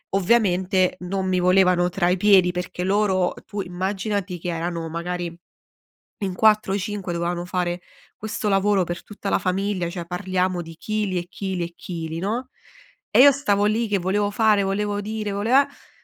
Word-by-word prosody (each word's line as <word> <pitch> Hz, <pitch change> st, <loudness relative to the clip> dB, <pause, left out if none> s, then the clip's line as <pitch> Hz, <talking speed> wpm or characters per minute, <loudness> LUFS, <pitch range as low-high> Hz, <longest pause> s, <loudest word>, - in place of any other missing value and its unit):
Ovviamente, 190 Hz, -3 st, +2 dB
non 190 Hz, +1 st, -3 dB
mi 185 Hz, -1 st, +1 dB
volevano 180 Hz, -1 st, +4 dB
tra 175 Hz, -1 st, +1 dB
i 180 Hz, -, +2 dB
piedi, 190 Hz, -2 st, +5 dB
perché 180 Hz, 0 st, -4 dB
loro 190 Hz, -1 st, +2 dB
tu 205 Hz, -1 st, -4 dB
immaginati 190 Hz, +1 st, -3 dB
che 180 Hz, -, -4 dB
erano 165 Hz, 0 st, -3 dB
magari 170 Hz, +1 st, -4 dB, 0.9 s
in 190 Hz, -2 st, -1 dB
4 215 Hz, -1 st, +3 dB
o -, -, +1 dB
5 200 Hz, -2 st, -4 dB
dovevano 175 Hz, +1 st, -2 dB
fare 180 Hz, -1 st, -2 dB, 0.3 s
questo 215 Hz, 0 st, -4 dB
lavoro 195 Hz, 0 st, +3 dB
per 175 Hz, 0 st, -5 dB
tutta 205 Hz, -1 st, -6 dB
la -, -, +2 dB
famiglia, 185 Hz, -1 st, -1 dB
cioè 175 Hz, -1 st, -6 dB
parliamo 185 Hz, 0 st, -1 dB
di 165 Hz, -1 st, -10 dB
chili 210 Hz, -1 st, -2 dB
e 175 Hz, 0 st, -3 dB
chili 190 Hz, -1 st, -4 dB
e 170 Hz, 0 st, -6 dB
chili, 165 Hz, -2 st, -5 dB
no, 225 Hz, +7 st, -2 dB, 0.6 s
e -, -, +4 dB
io 285 Hz, +1 st, +9 dB
stavo 205 Hz, -7 st, +1 dB
lì 220 Hz, +2 st, +1 dB
che 205 Hz, -, +2 dB
volevo 200 Hz, +3 st, 0 dB
fare, 215 Hz, -2 st, +3 dB
volevo 205 Hz, +1 st, -1 dB
dire, 215 Hz, 0 st, -4 dB
vole 205 Hz, +4 st, -2 dB
eh 280 Hz, +2 st, +2 dB
190 Hz, 170 wpm, -23 LUFS, 180-205 Hz, 0.9 s, io